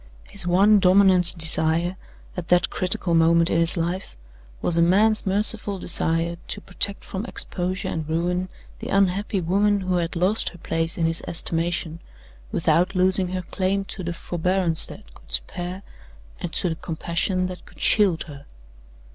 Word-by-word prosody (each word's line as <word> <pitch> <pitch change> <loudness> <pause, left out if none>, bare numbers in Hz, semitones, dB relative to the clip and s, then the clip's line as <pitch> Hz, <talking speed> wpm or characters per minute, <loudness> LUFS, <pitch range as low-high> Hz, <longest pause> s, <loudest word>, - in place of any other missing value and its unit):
His 190 -3 +3
one 200 +4 +5
dominant 185 -1 +4
desire, 165 +2 +2 0.4
at 180 -2 -6
that 180 0 +2
critical 180 -1 -2
moment 165 +1 +4
in 165 - +2
his 165 +1 +2
life, 170 - -3 0.4
was 170 - -1
a 170 - +3
man's 205 +5 +3
merciful 205 +1 0
desire 170 -1 -1
to - - -4
protect 200 +2 -2
from 190 +1 -5
exposure 185 -3 -2
and 155 -1 -4
ruin 180 +3 -1 0.3
the - - -7
unhappy 195 +1 +1
woman 200 +4 +1
who 185 -1 -1
had 170 0 -2
lost 185 +6 +1
her 175 - -14
place 165 0 -3
in 165 - 0
his 165 0 0
estimation, 165 0 -2 0.5
without 180 +3 +1
losing 185 0 +2
her 185 0 -4
claim 195 +2 -2
to 195 - -6
the 175 - -3
forbearance 175 0 +1
that - - -13
could - - -19
spare, 175 - -2 0.6
and 175 - -5
to 180 - 0
the 160 - -3
compassion 170 +3 -2
that 180 0 -7
could - - -18
shield 195 -7 +3
her. 145 -3 -12
180 Hz, 160 wpm, -23 LUFS, 165-190 Hz, 0.6 s, one